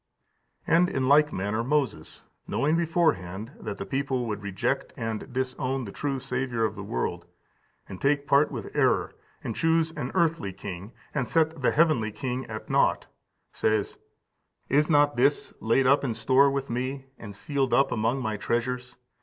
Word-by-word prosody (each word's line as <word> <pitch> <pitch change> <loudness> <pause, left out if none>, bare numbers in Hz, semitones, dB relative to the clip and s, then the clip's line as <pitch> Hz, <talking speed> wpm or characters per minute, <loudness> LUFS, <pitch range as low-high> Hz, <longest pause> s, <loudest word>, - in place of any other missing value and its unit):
And 175 +2 +4
in 130 -1 -1
like 150 +2 +5
manner 105 +4 -1
Moses, 145 +1 -2 0.2
knowing 150 +3 +1
beforehand 125 - 0
that 105 -2 -5
the - - -5
people 135 -2 -1
would 105 -2 -4
reject 100 -2 -2
and 115 +3 -4
disown 130 0 -2
the 100 - -7
true 140 +2 -2
Saviour 125 -3 -1
of 110 - -1
the 105 - -8
world, - - -3 0.6
and 95 - -9
take 140 0 +2
part 145 +1 +4
with - - -7
error, - - +2 0.3
and 115 - -4
choose 165 0 +2
an 145 -5 -5
earthly 165 - +1
king, 95 +1 -7 0.2
and 135 -5 -1
set 160 -2 +1
the 125 - +3
heavenly 150 -9 +2
King 125 +3 -4
at 110 -1 -7
nought, - - +2 0.5
says: 110 -2 0 0.7
"Is 150 +3 +3
not 145 -3 +4
this 140 +4 +2
laid 115 +4 +2
up 140 +3 +4
in 120 -5 -1
store 130 +5 +4
with 135 0 -2
me, 130 +3 -3
and 100 -3 -9
sealed 135 +3 -1
up 135 0 +3
among 115 +4 0
my 110 -2 -2
treasures? 125 +3 -2
130 Hz, 165 wpm, -27 LUFS, 110-145 Hz, 0.7 s, like